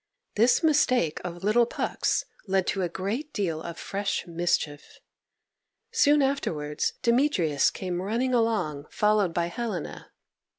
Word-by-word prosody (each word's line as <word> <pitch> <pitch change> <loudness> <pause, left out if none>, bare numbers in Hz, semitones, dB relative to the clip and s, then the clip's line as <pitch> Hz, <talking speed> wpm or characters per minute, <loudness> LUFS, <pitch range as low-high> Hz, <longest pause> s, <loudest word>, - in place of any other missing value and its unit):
This 235 +8 +3
mistake 255 - +2
of 175 0 -6
little 230 +3 +3
Puck's - - -1 0.2
led 190 -1 +1
to 195 - -1
a 175 - 0
great 210 - -4
deal 165 -6 -2
of 170 0 -7
fresh 200 +2 -2
mischief. 165 -4 -2 0.9
Soon 290 0 +4
afterwards 150 - -1
Demetrius 235 - +3
came 180 -2 -4
running 235 +6 -1
along, 180 -12 0
followed 210 -3 +2
by 170 0 0
Helena. 185 -1 -5
195 Hz, 125 wpm, -27 LUFS, 170-235 Hz, 0.9 s, Soon